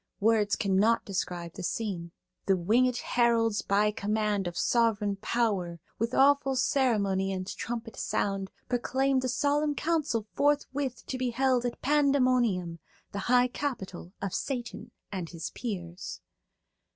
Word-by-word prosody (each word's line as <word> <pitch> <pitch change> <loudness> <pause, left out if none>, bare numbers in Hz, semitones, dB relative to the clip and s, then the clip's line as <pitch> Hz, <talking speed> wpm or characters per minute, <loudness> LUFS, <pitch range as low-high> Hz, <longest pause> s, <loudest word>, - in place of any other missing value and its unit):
Words 210 -1 +3
cannot 205 +3 +2
describe 180 -3 -3
the - - -8
scene. 180 -4 -3 0.4
"The 195 - +5
wingèd 235 +8 +2
heralds 230 -3 +2
by 205 +1 +2
command 210 -2 0
Of 175 - -5
sovereign 215 -4 +2
power, 195 -6 -1 0.2
with 230 +3 -1
awful 275 -1 +4
ceremony 205 -8 +1
And 185 -1 -3
trumpet 230 +3 -5
sound, 195 -1 -1 0.2
proclaimed 260 +2 +1
A - - 0
solemn 290 +3 +1
council 300 -10 0
forthwith 285 -3 0
to 260 - -4
be 255 -1 0
held 250 0 +1
At 240 - -7
Pandæmonium, 255 - +2 0.3
the 200 - -4
high 250 0 +5
capital 200 -10 -5
Of 195 - -2
Satan 245 -4 -4 0.2
and 180 -5 -4
his 165 -2 -6
peers." 180 -6 -5
225 Hz, 130 wpm, -29 LUFS, 195-255 Hz, 0.4 s, The